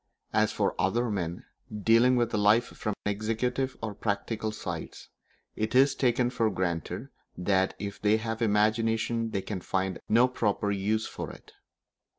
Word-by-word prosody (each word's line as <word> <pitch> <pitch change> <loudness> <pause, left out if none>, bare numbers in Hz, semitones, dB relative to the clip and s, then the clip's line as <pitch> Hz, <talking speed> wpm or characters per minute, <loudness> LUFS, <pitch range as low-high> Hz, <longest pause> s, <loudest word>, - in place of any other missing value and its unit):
As - - +3
for - - 0
other 115 +6 +1
men, 90 -4 -3 0.3
dealing 115 +4 +4
with 120 -2 +1
life 105 +3 +4
from 105 -4 -4
the 105 - +2
executive 120 +5 -1
or 110 -2 -2
practical 105 +2 -2
sides, - - -6 0.5
it 110 +3 -2
is 135 +1 +6
taken 125 -2 +1
for 115 -3 +1
granted 90 -4 -3 0.3
that 95 +1 +1
if 100 0 -6
they 105 +1 +4
have 110 +1 -4
imagination 115 +2 +1
they 100 -3 -2
can 100 -4 -4
find 95 0 -1
no 120 +3 +5
proper 105 -4 0
use 105 +3 0
for - - -6
it. - - -13
110 Hz, 155 wpm, -28 LUFS, 100-115 Hz, 0.5 s, is